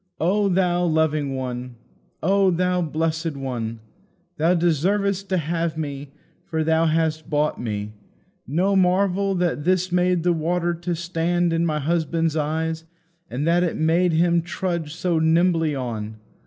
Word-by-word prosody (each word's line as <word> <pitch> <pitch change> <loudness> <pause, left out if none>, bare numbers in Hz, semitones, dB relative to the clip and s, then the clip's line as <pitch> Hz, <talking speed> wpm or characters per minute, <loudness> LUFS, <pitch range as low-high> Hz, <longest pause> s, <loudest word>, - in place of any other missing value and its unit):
O 200 +4 +2
Thou 180 -1 +2
loving 155 -4 +1
One! 125 -1 -5 0.5
O 195 +2 +3
Thou 180 +1 +1
blessed 160 -1 -2
One! 115 -4 -4 0.6
Thou 165 +4 +3
deservest 190 +4 +1
to 185 - +1
have 165 0 -2
me, 145 -2 -5 0.3
for 160 -1 -2
Thou 160 +1 +2
hast 160 0 0
bought 150 -1 0
me. 105 -2 -4 0.5
No 180 +9 +1
marvel 195 +1 +2
that 175 -4 0
this 185 +1 +1
made 180 -1 +2
the 175 0 +3
water 170 +2 0
to 175 +1 -3
stand 170 +1 0
in 165 +1 +1
my 155 -1 0
husband's 165 +1 0
eyes, 160 +1 -1 0.5
and 130 +5 -3
that 170 +1 +3
it 175 -2 -1
made 165 +2 +2
him 170 +1 +3
trudge 170 -2 -3
so 175 -1 0
nimbly 165 -1 +2
on. 110 -4 -4
165 Hz, 145 wpm, -23 LUFS, 155-180 Hz, 0.6 s, O